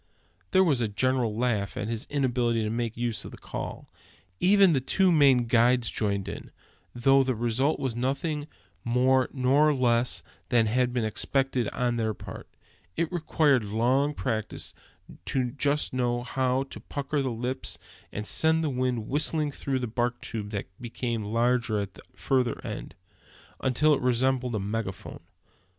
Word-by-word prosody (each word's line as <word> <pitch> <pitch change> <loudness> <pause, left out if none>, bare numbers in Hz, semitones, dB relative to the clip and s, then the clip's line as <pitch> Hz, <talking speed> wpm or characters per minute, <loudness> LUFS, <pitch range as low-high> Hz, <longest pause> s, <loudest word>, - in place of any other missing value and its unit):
There 190 - +5
was 145 -9 +2
a 115 - +1
general 115 +1 0
laugh 110 -5 -1
at 105 - -2
his 115 0 -4
inability 120 -5 +1
to 105 - -1
make 115 -1 -2
use 120 -2 -2
of - - -8
the - - -11
call; - - -6 0.5
even 195 -2 +5
the 135 - +1
two 185 +7 +2
Maine 135 -6 +5
guides 120 +1 +3
joining 100 -3 -1
in, 100 - -7 0.4
though 135 +3 +4
the 130 -1 0
result 120 +6 0
was 130 -4 -2
nothing 145 +4 -2 0.4
more 130 +2 +3
nor 140 +4 +3
less 120 -1 +1 0.3
than 120 -3 +4
had 125 +3 +1
been 120 -2 -1
expected 130 +2 0
on 120 -1 -1
their 110 -2 -1
part. - - -9 0.5
It 170 0 0
requires 150 -7 +2
long 130 +6 +2
practice 110 -5 -3 0.5
to 130 - 0
know 120 -1 -4
just 145 0 0
how 125 +1 0
to - - -7
pucker 145 +1 -4
up 140 - +2
the 130 - -1
lips, 125 +3 -3 0.3
and 105 - -5
send 160 +6 +2
the 150 - 0
wind 125 -3 -1
whistling 150 +1 0
through 135 -1 -2
the 125 - -2
bark 120 +1 -1
tube 105 -3 -5
that 100 -2 -3 0.2
becomes 115 -2 -3
larger 115 0 +1
at 100 -2 -4
the - - -14
further 120 +5 0
end, - - -6 0.6
until 150 +4 +3
it 140 - 0
resembles 125 -1 +1
a - - 0
megaphone. 100 -1 -4
125 Hz, 165 wpm, -27 LUFS, 115-135 Hz, 0.6 s, There